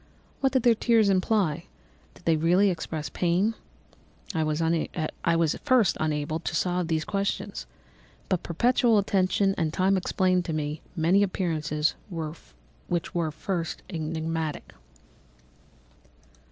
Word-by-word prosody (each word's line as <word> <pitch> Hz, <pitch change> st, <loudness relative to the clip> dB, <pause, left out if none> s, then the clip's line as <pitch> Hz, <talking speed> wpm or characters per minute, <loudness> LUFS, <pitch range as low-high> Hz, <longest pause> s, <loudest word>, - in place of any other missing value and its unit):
What 270 Hz, -1 st, +2 dB
did 260 Hz, -3 st, +2 dB
their 240 Hz, -, +6 dB
tears 225 Hz, -2 st, +3 dB
imply? 190 Hz, -3 st, +1 dB, 0.5 s
Did -, -, -19 dB
they 165 Hz, -, +4 dB
really 180 Hz, +5 st, +3 dB
express 160 Hz, -3 st, -4 dB
pain? 180 Hz, +5 st, +1 dB, 0.8 s
I 160 Hz, -, 0 dB
was 155 Hz, 0 st, -1 dB, 0.9 s
at -, -, -10 dB
first 255 Hz, -9 st, +4 dB
unable 155 Hz, 0 st, -1 dB
to 165 Hz, 0 st, -4 dB
solve 180 Hz, 0 st, 0 dB
these 160 Hz, -1 st, 0 dB
questions, 200 Hz, -1 st, -3 dB, 0.6 s
but 185 Hz, -2 st, 0 dB
perpetual 235 Hz, +5 st, +2 dB
attention 195 Hz, 0 st, +2 dB
and 160 Hz, -2 st, 0 dB
time 190 Hz, +3 st, +2 dB
explained 185 Hz, 0 st, +1 dB
to 165 Hz, -, -3 dB
me 150 Hz, 0 st, -3 dB
many 175 Hz, +4 st, +3 dB
appearances 160 Hz, -6 st, 0 dB, 1.0 s
which 175 Hz, -1 st, -2 dB
were 170 Hz, -2 st, 0 dB
at 155 Hz, -, -6 dB
first 170 Hz, -2 st, -3 dB
enigmatic. 160 Hz, -1 st, -3 dB
175 Hz, 125 wpm, -27 LUFS, 160-195 Hz, 1.0 s, their